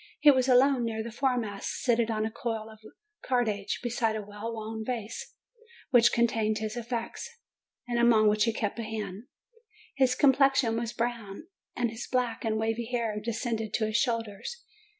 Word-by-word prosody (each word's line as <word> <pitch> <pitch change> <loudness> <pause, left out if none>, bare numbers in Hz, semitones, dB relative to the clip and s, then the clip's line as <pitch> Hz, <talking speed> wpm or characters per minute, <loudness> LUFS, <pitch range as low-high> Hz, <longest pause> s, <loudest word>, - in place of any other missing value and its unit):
He 295 0 +8
was 260 -1 +2
alone 260 0 +5
near 220 -1 -2
the 235 - -6
fore 255 +2 +1
mast, 205 -4 -3
seated 235 -2 +1
on 215 -1 0
a 220 - -3
coil 225 -1 -4
of 220 - -15 0.4
cordage, 220 -6 0
beside 230 -2 0
a 215 - -3
well 210 +3 -6
worn 220 0 -5
valise, 230 -2 -5 0.6
which 240 -2 +6
contained 225 -2 +1
his 215 +1 -3
effects, 240 - -4 0.6
and 240 -1 0
upon 230 -2 +5
which 210 +1 +3
he 230 - +2
kept 215 0 -3
a - - -2
hand. 215 -1 -5 0.7
His 260 -2 +3
complexion 270 -4 +4
was 230 0 -2
brown, 235 -2 -3 0.3
and 240 -2 0
his 225 +1 -7
black 250 -3 0
and 220 -1 0
wavy 225 +1 -1
hair 230 -3 -2
descended 225 -1 -2
to 220 - +1
his 215 +1 +1
shoulders. 230 - -2
230 Hz, 170 wpm, -29 LUFS, 220-245 Hz, 0.7 s, He